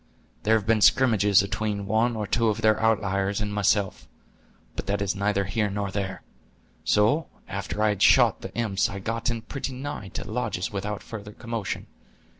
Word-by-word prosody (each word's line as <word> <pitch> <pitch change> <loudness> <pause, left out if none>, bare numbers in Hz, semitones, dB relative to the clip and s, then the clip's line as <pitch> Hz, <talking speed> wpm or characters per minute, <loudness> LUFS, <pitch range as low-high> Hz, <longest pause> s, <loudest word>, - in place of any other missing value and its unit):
There 110 +1 +3
have 105 -3 0
been 110 -1 +2
scrimmages 105 +1 +5
atween 100 0 -2
one 110 +3 +1
or 105 -1 -2
two 115 +3 +1
of 110 0 0
their 110 -1 +3
outlyers 100 -2 +1
and 105 -1 -2
myself; 100 -1 +1 0.7
but - - -5
that 100 +1 0
is 100 0 -1
neither 100 0 0
here 105 +2 0
nor 100 0 -3
there. 95 -2 -4 0.6
So, 105 - +3 0.2
after 100 +2 -3
I 110 - +4
had 105 -2 -2
shot - - +5
the - - -7
imps, 110 -3 0
I 100 - -6
got 115 +5 -2
in 115 -2 -3
pretty 135 -1 -5
nigh 130 -5 -5
to - - -3
the - - -9
lodges - - -2
without 105 +1 -4
further 105 -2 -8
commotion. 115 -3 -4
105 Hz, 185 wpm, -26 LUFS, 100-110 Hz, 0.7 s, scrimmages